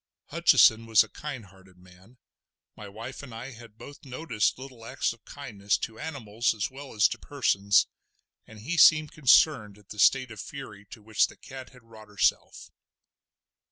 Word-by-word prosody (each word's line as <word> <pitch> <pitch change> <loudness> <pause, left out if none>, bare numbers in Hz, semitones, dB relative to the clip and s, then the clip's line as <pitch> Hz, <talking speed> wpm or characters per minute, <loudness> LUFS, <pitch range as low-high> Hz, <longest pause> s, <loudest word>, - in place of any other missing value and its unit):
Hutcheson 115 +1 +4
was 110 -2 +5
a - - -14
kind 130 -7 -8
hearted 95 -1 -20
man—my 95 +3 -19
wife 115 +6 -9
and 130 -5 -11
I 125 +4 -8
had 115 -2 -15
both 145 +4 -13
noticed 125 -5 -2
little 130 -3 -12
acts 115 - -2
of 115 - -22
kindness 105 -8 -3
to 110 - -7
animals 120 -7 -2
as 105 +3 -3
well 135 -1 -11
as 105 - +5
to - - -6
persons—and 105 -3 -2
he 165 +10 -4
seemed 155 -2 +6
concerned 125 -7 +3
at 105 -1 -23
the 105 - -10
state 130 +4 +3
of 110 - -10
fury 110 -6 -10
to 115 -3 -13
which 110 0 +1
the - - -16
cat 130 -1 -11
had 125 -2 -19
wrought 110 -2 -15
herself. 105 0 -1
115 Hz, 165 wpm, -27 LUFS, 105-135 Hz, -, seemed